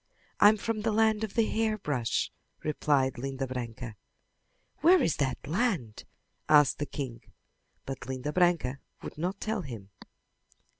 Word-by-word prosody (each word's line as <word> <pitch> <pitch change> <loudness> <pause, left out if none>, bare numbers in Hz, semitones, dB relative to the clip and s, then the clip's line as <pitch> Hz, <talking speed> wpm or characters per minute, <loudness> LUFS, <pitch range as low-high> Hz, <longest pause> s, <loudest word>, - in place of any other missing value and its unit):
"I'm 210 +1 +7
from 215 +1 -2
the 220 +1 +1
land 220 0 +3
of 215 - -4
the 230 -2 +4
hairbrush," 215 - 0 0.3
replied 140 -4 +1
Linda 135 +1 -3
Branca. 120 -3 -6 0.8
"Where 360 +3 +6
is 170 - +1
that 135 -3 -1
land?" 170 - -1 0.4
asked 150 -3 +5
the 145 - -2
king, 125 -5 -5 0.6
but 135 -1 -6
Linda 130 +3 -3
Branca 170 -7 +2 0.2
would - - -8
not 185 +4 -2
tell 220 -1 -2
him. 115 - -8
150 Hz, 135 wpm, -29 LUFS, 130-210 Hz, 0.8 s, I'm